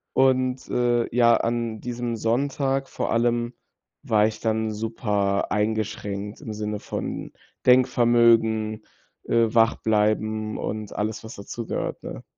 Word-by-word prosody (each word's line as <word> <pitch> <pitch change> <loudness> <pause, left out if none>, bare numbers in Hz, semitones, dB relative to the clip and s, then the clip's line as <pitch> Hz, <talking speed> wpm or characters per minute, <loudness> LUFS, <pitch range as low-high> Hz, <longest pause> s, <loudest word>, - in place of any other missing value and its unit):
Und, 130 -1 +2
äh, 120 -1 +1
ja, 120 -1 +6
an 115 -1 -2
diesem 120 0 -3
Sonntag 135 +4 0
vor - - -3
allem 120 +1 +1 0.5
war 105 -1 +3
ich 110 -1 -5
dann 110 -1 0
super 105 -2 -1
eingeschränkt 105 -1 -2
im 115 -7 -6
Sinne 105 0 -3
von - - -5 0.3
Denkvermögen, 115 -3 +4 0.4
äh, 115 -1 +2
wach 115 -1 +4
bleiben 110 0 0
und 110 -1 -4
alles, 110 +1 -2
was 110 - -9
dazu 110 +3 -7
gehört, - - -3
ne? - - -7
115 Hz, 125 wpm, -24 LUFS, 110-120 Hz, 0.5 s, ja